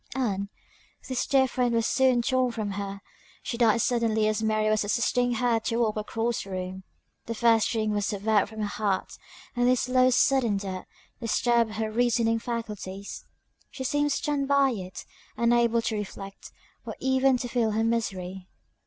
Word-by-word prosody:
Ann! 200 -6 -1 0.6
this 260 -2 -2
dear 265 -1 +4
friend 245 -1 0
was 230 -1 +2
soon 255 -2 +3
torn 255 0 +1
from 215 -3 -3
her 200 0 -5 0.4
she - - -3
died 230 -1 +3
suddenly 225 -3 +1
as 215 0 0
Mary 215 -1 +1
was 215 0 +2
assisting 240 +4 +1
her 235 0 +2
to 230 +1 -2
walk 225 -3 +1
across 225 +2 -2
the 195 - -12
room. 185 0 -5 0.4
The 230 - -3
first 225 -1 +4
string 215 -2 -1
was 205 -1 0
severed 205 0 +1
from 220 -1 -7
her - - 0
heart 205 -2 -2 0.4
and 245 0 +2
this 250 -1 +3
"slow, 255 0 +3
sudden 250 -4 +3
death" 190 -2 -5 0.3
disturbed 235 -1 +1
her 220 0 -2
reasoning 230 -1 +2
faculties; 210 -5 -6 0.4
she 260 - -7
seemed 290 +2 +1
stunned 280 0 -1
by 280 -1 +4
it; 185 -5 -7 0.3
unable 235 0 +3
to 220 - -1
reflect, 195 -1 -7 0.3
or - - -6
even 265 0 +3
to 245 - -4
feel 235 -2 +1
her 220 +1 +1
misery. 190 -5 -2
230 Hz, 170 wpm, -27 LUFS, 210-245 Hz, 0.6 s, dear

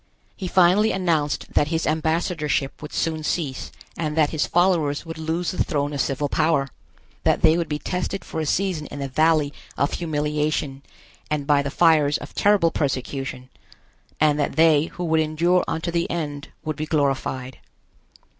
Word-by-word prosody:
He 190 - -5
finally 185 +4 +4
announced 165 -6 -1
that 145 - +3
his 160 +1 -1
ambassadorship 160 -3 -1
would 150 - -8
soon 160 -1 -1
cease 150 -5 -2 0.2
and 155 -1 -3
that 150 -2 +3
his 155 - 0
followers 170 -5 +2
would 165 -1 -7
lose 165 +2 -1
the 185 - 0
throne 145 -3 -2
of 140 - 0
civil 140 +2 -1
power, 150 -2 +1 0.5
that - - +2
they 160 0 +6
would 170 -1 -1
be 150 - -1
tested 180 +4 -3
for - - -5
a 155 - -2
season 175 -4 0
in - - -8
the 140 -1 -3
valley 155 +1 +2 0.2
of 140 - 0
humiliation 150 -3 -1 0.5
and 150 -2 -1
by 145 -1 +3
the 140 - -3
fires 155 -2 +4
of 145 - -10
terrible 200 -5 +3
persecution, 135 -2 -3 0.7
and 150 -1 +3
that 145 - -1
they 160 -2 +5
who 175 +1 -7
would 160 -2 +2
endure 165 +4 +2
unto 165 +2 -2
the 170 0 -1
end 145 -4 -4 0.2
would 155 -2 -3
be 155 0 -3
glorified. 135 -4 -1
155 Hz, 170 wpm, -23 LUFS, 145-170 Hz, 0.7 s, they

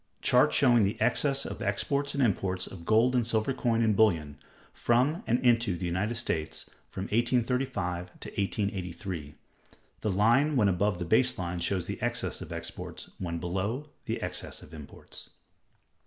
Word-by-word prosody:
_Chart - - +5
showing 120 -5 +5
the 100 +1 -1
Excess 135 +4 +1
of - - -6
Exports 140 +7 -1
and 140 - +2
Imports 95 -4 0
of 85 -3 -10
Gold 115 +4 +4
and 125 -2 +3
Silver 115 +3 0
Coin 115 -2 +1
and 110 -2 +3
Bullion, 80 -9 +2 0.3
from 130 - +2
and 120 - +2
into 115 -6 +3
the 90 - -4
United 95 +7 -1
States, 85 -9 -3 0.2
from 95 - -6
1835 115 -6 -1
to - - -6
1883. 95 -6 -3 0.6
The 110 - -1
line 120 +10 +3
when 105 -6 +4
above 95 +1 +1
the 90 - -3
base 110 +8 +3
line 90 -1 -3
shows 90 +1 -1
the - - -5
excess - - -2
of - - -8
exports; - - -7
when 85 -2 -3
below, 100 - -3
the - - -2
excess - - -4
of 75 - -15
imports. 75 -3 -10
105 Hz, 160 wpm, -29 LUFS, 90-120 Hz, 0.6 s, Chart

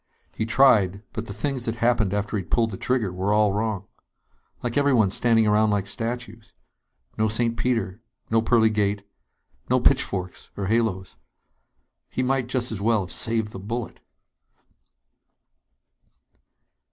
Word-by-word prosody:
He 110 - -3
tried, 105 -6 +4
but 115 0 -5
the - - -6
things 130 +3 -2
that 115 - -2
happened 115 -4 +1
after 105 +1 -2
he'd 95 -5 -4
pulled 115 -2 +1
the - - -5
trigger 115 -6 -1
were 95 +3 -1
all 105 -1 +3
wrong. 105 -2 -2 0.8
Like 120 -1 -2
everyone 130 -9 +3
standing 115 +1 +3
around 105 +1 +3
like 100 -2 0
statues. 115 +1 -5 0.7
No 110 - +3
St. 115 +2 0
Peter, 115 -4 -1 0.3
no 115 0 +4
pearly 110 -1 +3
gate, 100 -1 -1 0.6
no - - +3
pitchforks 90 -2 0
or 100 - -2
halos. 100 -3 -1 0.9
He 130 - -2
might 130 -1 0
just 125 -1 -2
as 105 -3 -5
well 110 0 +2
have 90 - -6
saved 110 -2 -1
the 95 - -8
bullet! 115 +4 -5
110 Hz, 140 wpm, -24 LUFS, 100-120 Hz, 0.9 s, tried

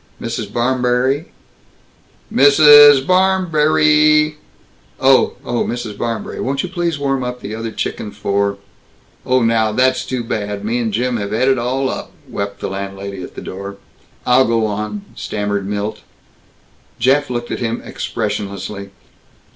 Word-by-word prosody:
Mrs. 115 -3 -4
Barmberry. 125 +4 0 1.1
Mrssssssss. 145 -1 +8
Barrrrrrrmberrrrrry! 155 -4 +3 0.6
Oh. 135 0 +4
Oh, 120 -1 -1
Mrs. 120 -3 -4
Barmberry, 115 +1 -4
won't 135 +1 -1
you 185 - -4
please 175 -4 -2
warm 135 -2 -1
up 125 0 -5
that 105 +2 -6
other 115 0 -4
chicken 105 0 -4
for 100 -1 -1 0.3
" - - -34
"Oh, 130 -1 +3
now, 115 -1 +2
that's 130 +3 +2
too 125 -2 -3
bad. 105 -2 -4
Me 115 +3 0
and 115 -2 -1
Jim 125 +2 -1
have 100 -1 -4
et 115 +4 +1
it 135 -2 +3
all 130 +3 -1
up!" - - -5 0.2
wept 100 0 -5
the - - -2
landlady, 100 0 -6
at - - -9
the - - -7
door. 100 +1 -7 0.5
"I'll 125 +1 +5
go 115 -1 +1
on," 105 - -4
stammered 105 -1 -3
Milt. 105 +1 -3 1.0
Jeff 135 +4 +2
looked 120 -1 -4
at - - -3
him 115 -1 -2
expressionlessly. 100 0 -4
120 Hz, 145 wpm, -17 LUFS, 105-135 Hz, 1.1 s, Mrssssssss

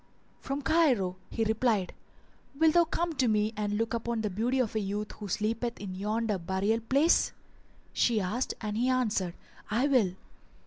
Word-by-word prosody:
"From 275 +1 -4
Cairo," 250 - +2
he 225 - -1
replied. 220 -3 +1 0.6
"Wilt 320 0 +4
thou 345 -1 +5
come 345 +1 -1
with 265 -7 +1
me 215 +1 +1
and 210 0 -1
look 225 +1 -1
upon 235 0 -1
the 210 -2 -2
beauty 235 +7 0
of 250 -5 0
a 220 - 0
youth 205 +1 -3
who 210 - -8
sleepeth 230 +5 -2
in 195 -2 -6
yonder 210 +1 -1
burial 190 +6 0
place?" 275 +8 +3 0.6
she 230 -3 +2
asked 210 +7 -2
and 210 -1 -3
he 250 +2 +2
answered, 215 -9 0 0.3
"I 230 +5 +2
will." 240 -11 +2
225 Hz, 170 wpm, -29 LUFS, 205-255 Hz, 0.6 s, thou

